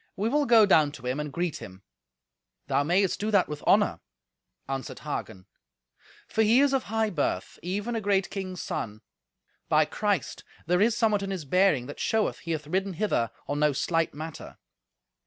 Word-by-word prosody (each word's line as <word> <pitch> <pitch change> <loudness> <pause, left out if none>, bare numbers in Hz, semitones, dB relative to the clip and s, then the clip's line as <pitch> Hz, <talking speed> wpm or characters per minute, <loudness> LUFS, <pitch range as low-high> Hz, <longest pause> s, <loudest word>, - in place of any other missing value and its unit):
We 205 +3 -1
will 290 +2 +1
go 230 -3 +7
down 155 -7 +4
to 130 -5 -11
him 130 +3 -1
and 150 -1 -4
greet 175 +1 -2
him." 95 +1 -11 0.8
"Thou - - +1
mayest 180 +6 +1
do 210 - -1
that 200 -4 +3
with 150 -1 -6
honour," - - +4 0.7
answered 135 -1 -4
Hagen; 110 -10 -5 0.8
"for 220 - 0
he 225 +3 +5
is 280 0 +3
of 270 - 0
high 220 0 0
birth, 150 -6 -2
even 205 +7 -3
a 225 - -1
great 195 -1 +1
king's 185 -3 -5
son. 105 0 -4 0.7
By - - +4
Christ, - - -2 0.2
there 180 +3 +2
is 230 +2 +3
somewhat 215 -3 +2
in 195 - -4
his 185 -6 -4
bearing 180 -4 +3
that 145 - -9
showeth 220 -1 0
he 170 - -6
hath 155 -1 -4
ridden 190 +5 -1
hither 170 - 0 0.2
on 145 - -2
no 150 -1 +3
slight 165 +4 0
matter." 160 +1 -8
180 Hz, 180 wpm, -27 LUFS, 150-210 Hz, 0.8 s, go